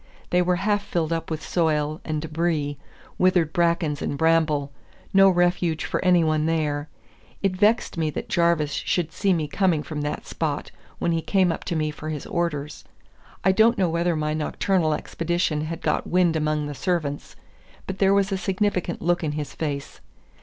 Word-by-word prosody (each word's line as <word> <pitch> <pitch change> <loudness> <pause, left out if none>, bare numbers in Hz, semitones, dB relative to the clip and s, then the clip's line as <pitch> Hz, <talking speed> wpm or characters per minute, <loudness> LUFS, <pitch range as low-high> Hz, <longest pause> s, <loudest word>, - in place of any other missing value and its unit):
They 180 - +4
were 180 0 +2
half 205 +3 +1
filled 165 -4 -1
up 165 - -3
with 160 -1 -4
soil 155 -2 0
and 155 -1 -3
debris, 155 -3 -1 0.4
withered 180 -4 +3
brackens 170 -4 +1
and 140 - -2
bramble, 155 -3 +2 0.4
no 195 0 +7
refuge 175 -3 +1
for - - -2
any 180 -2 +5
one 155 0 +1
there. 150 -2 -1 0.5
It 195 -2 +1
vexed 210 -2 +2
me 160 -1 +1
that 150 - -5
Jarvis 170 -4 +2
should 170 -3 -1
see 195 +3 0
me 160 -4 +1
coming 170 -1 +1
from 150 -2 -5
that 145 0 -3
spot - - -3 0.3
when 170 - 0
he 165 -1 0
came 185 0 +2
up 165 - -5
to 175 - -2
me 155 -1 0
for 155 +1 -7
his 150 -3 -4
orders. 150 -4 -3 0.6
I 190 - +5
don't 225 +5 +4
know 185 -3 +2
whether 170 +1 +1
my 150 0 -1
nocturnal 155 +1 0
expeditions 165 -2 -1
had 165 0 -5
got 150 - 0
wind 175 -2 +3
among 155 -1 0
the 145 - -5
servants, 150 -3 -2 0.5
but 190 0 -5
there 195 -1 +4
was 200 0 +2
a 190 - -1
significant 195 -3 -1
look 175 +1 +1
in 150 -2 -1
his 150 -1 -4
face. 140 -3 -4
165 Hz, 180 wpm, -24 LUFS, 150-180 Hz, 0.6 s, no